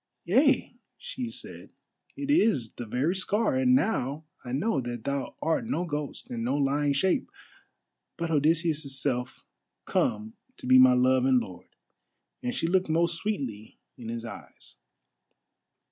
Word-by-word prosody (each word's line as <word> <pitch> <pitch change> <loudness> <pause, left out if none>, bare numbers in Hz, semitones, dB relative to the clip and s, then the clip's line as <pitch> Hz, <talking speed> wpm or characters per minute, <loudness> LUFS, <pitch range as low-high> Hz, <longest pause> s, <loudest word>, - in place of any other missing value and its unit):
"Yea," 260 - +3 0.2
she 250 -2 -5
said, - - -7 0.4
"it 285 0 -2
is 210 - +2
the 120 - -7
very 135 - 0
scar, 215 +8 0
and 255 -1 +4
now 155 - 0 0.2
I 125 - -7
know 145 - 0
that 120 -2 -5
thou 140 -1 -3
art 165 +8 0
no 180 -8 -1
ghost 145 -3 -5
and 115 -1 -3
no 130 +4 0
lying 145 +1 +1
shape, 190 - +1 0.9
but 170 -1 -2
Odysseus' 155 -2 +1
self, 125 -3 -2 0.4
come 110 +1 0 0.2
to - - -10
be 130 0 +7
my 130 0 +8
love 130 +1 +3
and 130 -1 +4
lord," 90 -5 -9 0.7
and 125 - -3
she - - -1
looked 185 +1 +1
most 170 +1 +2
sweetly 130 - -4 0.2
in 115 -2 -8
his 115 0 -5
eyes. 110 -4 -11
145 Hz, 145 wpm, -28 LUFS, 125-185 Hz, 0.9 s, my